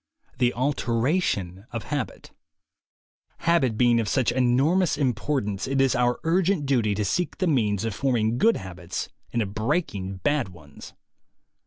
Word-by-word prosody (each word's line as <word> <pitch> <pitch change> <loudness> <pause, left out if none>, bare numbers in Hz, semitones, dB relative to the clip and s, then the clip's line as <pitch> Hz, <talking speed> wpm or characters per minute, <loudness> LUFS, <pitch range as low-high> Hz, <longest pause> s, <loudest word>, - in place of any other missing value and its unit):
THE 125 -1 +3
ALTERATION 120 - 0
OF 115 -2 -5
HABIT 145 -5 -4 1.1
HABIT 135 -10 +2
being 120 -1 +4
of 110 - -1
such 130 +3 +2
enormous 135 +9 +2
importance, 125 -6 -1
it 135 0 0
is 135 -1 +3
our 125 -1 +1
urgent 175 -1 +1
duty 120 -7 +1
to 105 +1 -1
seek 175 - -1
the 185 - 0
means 110 - +1
of 115 - -2
form 130 +4 0
ing 110 +1 +1
good 230 +1 +4
habits 90 -2 -6 0.2
and 115 - +1
of 100 -1 -7
breaking 105 - -1
bad 145 -7 +1
ones. 75 -5 -13
120 Hz, 150 wpm, -25 LUFS, 105-145 Hz, 1.1 s, being